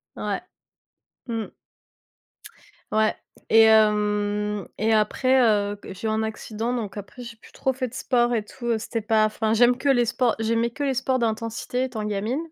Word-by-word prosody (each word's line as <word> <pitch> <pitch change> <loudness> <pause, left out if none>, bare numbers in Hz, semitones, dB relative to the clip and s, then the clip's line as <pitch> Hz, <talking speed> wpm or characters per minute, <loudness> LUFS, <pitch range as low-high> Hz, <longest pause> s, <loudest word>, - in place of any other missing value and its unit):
Ouais. - - -3 0.9
Mmh. 225 -2 -3 1.4
Ouais 215 0 +2 0.3
et 225 - +7
hem, 210 -2 +2
et 220 +1 +1
après, 255 +5 +3
heu, 205 -3 +2
g - - -8
j'ai 190 +4 -5
eu - - +1
un 220 0 0
accident 220 +1 -3
donc 215 -4 -5
après 205 +5 -9
j'ai 235 -1 -9
plus - - -18
trop 265 - -1
fait 255 0 -3
de 235 - -14
sport 245 -2 +1
et 215 -2 -2
tout, 235 +1 -2
c'était 225 +1 -4
pas, 215 0 +3
enfin, 215 0 -1
j'aime 245 +2 +5
que 280 +2 -1
les 245 -3 +4
sports, 245 0 +1
j'aimais 230 +1 +1
que 260 +5 -6
les 275 -1 +1
sports 260 0 0
d'intensité 230 +2 -2
étant 235 -5 -5
gamine. 210 +4 -2
225 Hz, 175 wpm, -24 LUFS, 215-245 Hz, 1.4 s, et